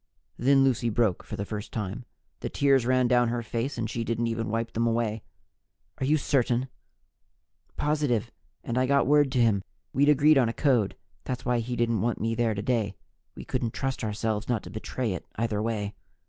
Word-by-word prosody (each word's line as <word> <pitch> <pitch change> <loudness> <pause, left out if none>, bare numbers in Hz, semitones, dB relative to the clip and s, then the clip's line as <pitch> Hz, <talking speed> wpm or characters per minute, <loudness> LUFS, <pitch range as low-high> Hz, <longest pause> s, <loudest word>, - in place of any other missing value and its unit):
Then 135 +2 +4
Lucy 125 -3 +2
broke 110 -4 +1
for - - -7
the 100 - -3
first 105 +1 -6
time. 110 +3 -4 0.3
The - - -4
tears 135 -4 +3
ran 130 -1 +3
down 120 -1 +4
her 120 0 -2
face 120 +4 -3
and 115 -1 -1
she 115 +1 -3
didn't 115 +1 -1
even 115 -2 -2
wipe 115 +1 -2
them 115 +1 +1
away. 115 -2 0 0.8
"Are 130 - 0
you 155 +2 +4
certain?" 130 -2 +1 1.1
"Positive. 145 -7 0 0.3
And 120 +1 -1
I 130 - +2
got 140 +1 +3
word 145 -1 +4
to 130 - +2
him. 110 -5 +3 0.3
We'd 145 +3 +4
agreed 150 0 +6
on 120 -3 +3
a - - -3
code. 125 -9 +2 0.3
That's 125 -2 -4
why 120 -1 +2
he 120 +2 -3
didn't 115 -3 +1
want 120 0 0
me 115 +1 0
there 115 -2 +1
today 105 -1 -1 0.4
we - - -9
couldn't 120 -3 -2
trust 135 -2 -2
ourselves 110 +1 -2
not 115 -4 0
to - - -9
betray 110 +1 -3
it, 90 - -7
either 110 -2 0
way." 105 -2 -2
120 Hz, 195 wpm, -27 LUFS, 110-130 Hz, 1.1 s, agreed